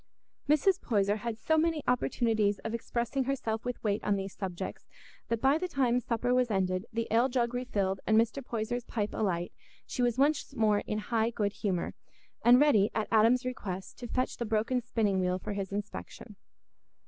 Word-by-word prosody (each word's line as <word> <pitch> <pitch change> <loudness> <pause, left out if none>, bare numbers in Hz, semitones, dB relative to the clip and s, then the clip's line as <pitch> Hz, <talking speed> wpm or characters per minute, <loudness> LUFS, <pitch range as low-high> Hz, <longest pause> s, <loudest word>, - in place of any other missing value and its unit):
Mrs. 305 +6 +3
Poyser 205 -2 +1
had 230 0 -4
so 315 +7 +2
many 320 -2 +1
opportunities 220 - +1
of 225 - -3
expressing 235 +3 -2
herself 230 -5 -2
with 245 0 -4
weight 210 -1 0
on 205 - +2
these 195 -1 -4
subjects 185 -3 -5 0.4
that 230 - -1
by 275 +4 +4
the 365 - -2
time 255 -7 +2
supper 245 +1 -1
was 250 -1 +2
ended, 185 -1 0
the 230 0 -2
ale 235 +4 +4
jug 245 -2 0
refilled, 200 -6 -1
and 220 - +4
Mr. 230 +5 +1
Poyser's 240 +1 -3
pipe 215 -3 -3
alight 175 -4 -1 0.3
she - - -3
was 240 -1 +2
once 285 +2 +1
more 215 -2 +3
in 210 - -1 0.2
high 225 0 +3
good 205 -3 -1
humour, 190 -5 -2 0.5
and 245 +1 +7
ready, 225 -9 +5
at 220 - -1
Adam's 230 +3 +4
request, 195 -7 -5
to 245 - -6
fetch 255 +2 -1
the - - -2
broken 225 +3 0
spinning 215 -5 0
wheel 180 0 +1
for 210 +3 -5
his 195 -1 -4
inspection. 205 +1 -6
225 Hz, 185 wpm, -30 LUFS, 205-250 Hz, 0.5 s, and